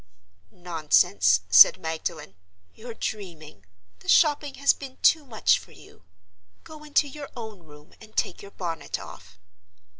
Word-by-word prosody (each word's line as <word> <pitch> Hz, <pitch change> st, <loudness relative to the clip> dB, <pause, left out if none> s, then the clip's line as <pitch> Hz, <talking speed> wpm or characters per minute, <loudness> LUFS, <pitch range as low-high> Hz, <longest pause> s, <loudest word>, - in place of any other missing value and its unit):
"Nonsense!" 150 Hz, -, +1 dB
said 90 Hz, -, +8 dB
Magdalen. 160 Hz, -6 st, -5 dB, 0.4 s
"You're 230 Hz, 0 st, -10 dB
dreaming; 155 Hz, -, -7 dB, 0.3 s
the -, -, -11 dB
shopping 295 Hz, -3 st, +3 dB
has 280 Hz, 0 st, +3 dB
been 270 Hz, -2 st, -11 dB
too 320 Hz, -2 st, +4 dB
much 220 Hz, -4 st, +2 dB
for -, -, -17 dB
you. -, -, -18 dB, 0.6 s
Go 310 Hz, -1 st, -13 dB
into 295 Hz, 0 st, +1 dB
your 285 Hz, 0 st, -9 dB
own 220 Hz, -4 st, -8 dB
room 150 Hz, -3 st, -18 dB
and 215 Hz, -1 st, -17 dB
take -, -, -2 dB
your 200 Hz, -, -11 dB
bonnet 170 Hz, -4 st, -5 dB
off." 95 Hz, 0 st, -13 dB
190 Hz, 140 wpm, -25 LUFS, -, 0.6 s, said